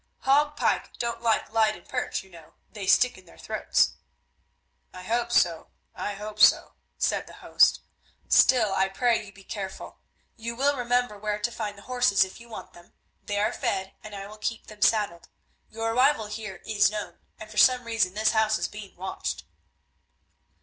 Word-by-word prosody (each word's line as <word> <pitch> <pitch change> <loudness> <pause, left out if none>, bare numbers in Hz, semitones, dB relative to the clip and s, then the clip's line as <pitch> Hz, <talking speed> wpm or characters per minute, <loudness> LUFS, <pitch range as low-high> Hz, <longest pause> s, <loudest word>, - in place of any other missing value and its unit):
"Hague 290 +2 +3
pike - - -1
don't 235 -1 -3
like 225 -2 +1
Leyden 215 -5 +1
perch, - - -3
you 190 - -20
know; 165 -3 -15 0.2
they 205 -3 -7
stick 250 0 +4
in 185 - -19
their 165 - -18
throats." - - +1 1.0
"I 185 - -9
hope 235 +4 -1
so, 170 -7 +2 0.3
I 205 - -4
hope 210 +1 -8
so," - - +5 0.2
said - - 0
the - - -12
host, - - +3 0.5
"still 230 -6 +5
I 190 0 +2
pray 230 +3 +1
you 200 - -12
be 195 0 -17
careful. 190 -1 -7 0.4
You 235 0 -5
will 280 +3 +2
remember 245 -4 0
where 210 0 -2
to 210 +3 -2
find 210 -3 -5
the 200 - -13
horses 245 -6 +3
if 190 +3 -9
you 235 0 -14
want 225 - -9
them; 175 0 -18 0.3
they 205 - -1
are 210 - +1
fed 190 0 -2
and 210 -1 -9
I 195 0 -6
will 215 +1 -12
keep 225 +1 -3
them 210 -1 -14
saddled. 205 -7 +1 0.4
Your 225 +1 -2
arrival 255 -1 +3
here 210 -3 -7
is 210 -1 +3
known, 210 0 -6 0.2
and 215 0 -10
for 210 - -11
some 250 +3 +5
reason 225 -5 0
this 215 +1 +2
house 220 -1 +2
is - - -2
being 205 -1 -11
watched." 190 +2 -4
215 Hz, 185 wpm, -26 LUFS, 195-235 Hz, 1.0 s, so